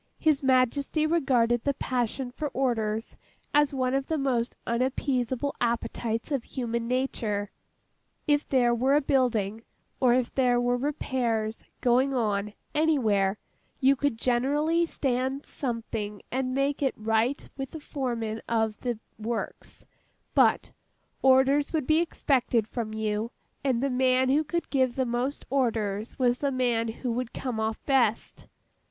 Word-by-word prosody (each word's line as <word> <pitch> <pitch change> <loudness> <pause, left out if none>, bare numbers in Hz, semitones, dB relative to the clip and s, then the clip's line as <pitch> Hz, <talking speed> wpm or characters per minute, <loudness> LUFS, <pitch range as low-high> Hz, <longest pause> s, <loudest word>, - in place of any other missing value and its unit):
His 310 -3 +2
Majesty 270 +3 +2
regarded 250 -8 +2
the 280 -1 0
passion 250 0 -2
for 300 +4 -3
orders, 225 -4 -1 0.4
as 295 -1 +4
one 255 -2 0
of 270 0 0
the 320 - 0
most 255 -4 0
unappeasable 255 +2 -1
appetites 235 +1 -1
of 275 -4 0
human 235 -2 -3
nature. 225 -5 -1 0.7
If 290 -1 +1
there 245 -3 +3
were 260 +4 +3
a 295 - +4
building, 225 -7 +1 0.4
or 250 -2 +4
if 250 -2 0
there 250 -2 +3
were 245 0 +2
repairs, 245 -5 -1 0.2
going 255 +3 +3
on, 210 -3 0 0.2
anywhere, 220 -11 +2 0.4
you 275 0 +5
could 280 -3 -1
generally 290 +8 +1
stand 265 -1 -1
something 225 -5 -4
and 255 0 -1
make 275 +1 0
it 270 -2 +1
right 225 +5 0
with 270 -1 -5
the 320 - -8
foreman 235 -7 -3
of 220 -2 0
the 240 -3 -2 0.2
works; 225 +1 -5 0.5
but, - - +3 0.5
orders 265 +3 +4
would 310 -4 0
be 310 +3 +4
expected 255 -9 +1
from 225 -2 -4
you, 220 +1 -2 0.3
and 260 -3 +1
the 275 - +1
man 255 0 +3
who 290 +4 +3
could 340 +3 -3
give 260 -3 +2
the 260 - +1
most 245 +4 -2
orders 220 -5 -1
was 245 -1 +2
the 280 -1 0
man 240 -3 +1
who 235 +2 -3
would 245 0 -3
come 250 -4 -3
off 220 0 -2
best. 250 -6 +1
255 Hz, 145 wpm, -27 LUFS, 230-275 Hz, 0.7 s, you